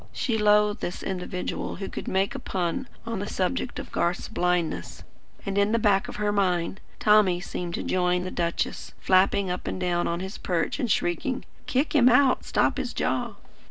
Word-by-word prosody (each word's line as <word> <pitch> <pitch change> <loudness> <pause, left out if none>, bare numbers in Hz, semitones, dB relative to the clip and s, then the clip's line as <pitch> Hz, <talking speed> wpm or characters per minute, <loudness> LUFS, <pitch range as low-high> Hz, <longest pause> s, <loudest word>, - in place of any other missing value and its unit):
She 245 -5 -1
loathed 210 0 +4
this 175 - -4
individual 180 -1 -3
who 195 +1 -5
could - - -7
make 195 +1 +1
a - - -5
pun 185 +8 -2 0.2
on 230 -3 -3
the 205 - -3
subject 200 +8 -2
of - - -7
Garth's 175 +1 0
blindness, 180 -2 -1 0.4
and, 200 0 0
in 200 +2 +2
the - - +4
back 205 -3 +3
of - - -7
her 210 0 0
mind, 185 -2 0 0.2
Tommy 210 -4 +4
seemed 175 -1 -4
to - - -4
join 180 -1 +1
the 185 - -4
duchess, 170 -1 -2
flapping 190 0 +3
up 180 - -4
and - - -3
down 175 -1 0
on 170 0 -1
his 190 +2 -6
perch 175 +7 -1
and 245 - -1
shrieking: 205 - 0 0.2
"Kick 270 +4 +1
him 255 -5 +6
out! 255 +1 +4
Stop - - +1
his - - -3
jaw!" - - -1
190 Hz, 190 wpm, -26 LUFS, 180-210 Hz, 0.4 s, him